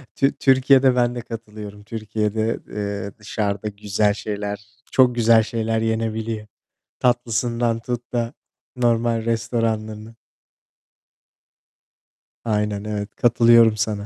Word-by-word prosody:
Tü 135 Hz, 0 st, +2 dB
Türkiye'de 130 Hz, -1 st, +5 dB
ben 120 Hz, 0 st, +1 dB
de 120 Hz, -, -4 dB
katılıyorum. 105 Hz, -3 st, -9 dB
Türkiye'de, 110 Hz, 0 st, -2 dB
eee, 100 Hz, -1 st, -4 dB
dışarıda 105 Hz, -1 st, -2 dB
güzel 105 Hz, 0 st, 0 dB
şeyler, 105 Hz, -1 st, -5 dB, 0.3 s
çok 125 Hz, -2 st, +4 dB
güzel 115 Hz, -1 st, +5 dB
şeyler 110 Hz, 0 st, -1 dB
yenebiliyor. 110 Hz, -1 st, -2 dB, 0.5 s
Tatlısından 120 Hz, -1 st, +1 dB
tut 120 Hz, +1 st, -5 dB
da, 120 Hz, 0 st, -1 dB, 0.4 s
normal 115 Hz, -2 st, +1 dB
restoranın 115 Hz, -1 st, -2 dB, 2.3 s
Aynen, 105 Hz, -2 st, -1 dB
evet. 105 Hz, -1 st, -5 dB
Katılıyorum 115 Hz, -2 st, +5 dB
sana. 105 Hz, -2 st, -2 dB
110 Hz, 100 wpm, -22 LUFS, 105-120 Hz, 2.3 s, Türkiye'de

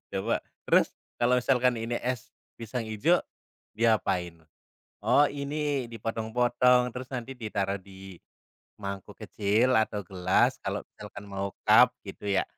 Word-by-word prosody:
coba, 100 Hz, +5 st, 0 dB, 0.3 s
"Terus -, -, +5 dB, 0.3 s
kalau 125 Hz, +1 st, +4 dB
misalkan 125 Hz, -1 st, +3 dB
ini 120 Hz, +1 st, -2 dB
es 125 Hz, -2 st, -3 dB, 0.3 s
pisang 115 Hz, +1 st, -4 dB
hijau, 130 Hz, +12 st, +2 dB, 0.6 s
diapain?" 100 Hz, -7 st, +1 dB, 0.7 s
"Oh 135 Hz, +6 st, +5 dB
ini 140 Hz, -2 st, -2 dB
dipotong-potong 120 Hz, +2 st, +2 dB
terus 125 Hz, 0 st, -6 dB
nanti 125 Hz, +2 st, -5 dB
ditaruh 100 Hz, -3 st, -2 dB
di, 95 Hz, -2 st, -12 dB, 0.6 s
mangkuk 100 Hz, -1 st, -6 dB
kecil 110 Hz, +5 st, +1 dB
atau 110 Hz, -1 st, 0 dB
gelas 90 Hz, 0 st, +2 dB
kalau -, -, -2 dB
misalkan 105 Hz, -, -10 dB
mau 100 Hz, 0 st, -4 dB
cup 120 Hz, +4 st, +7 dB
gitu 100 Hz, +1 st, -9 dB
ya 95 Hz, -, +2 dB
115 Hz, 125 wpm, -28 LUFS, 100-125 Hz, 0.7 s, cup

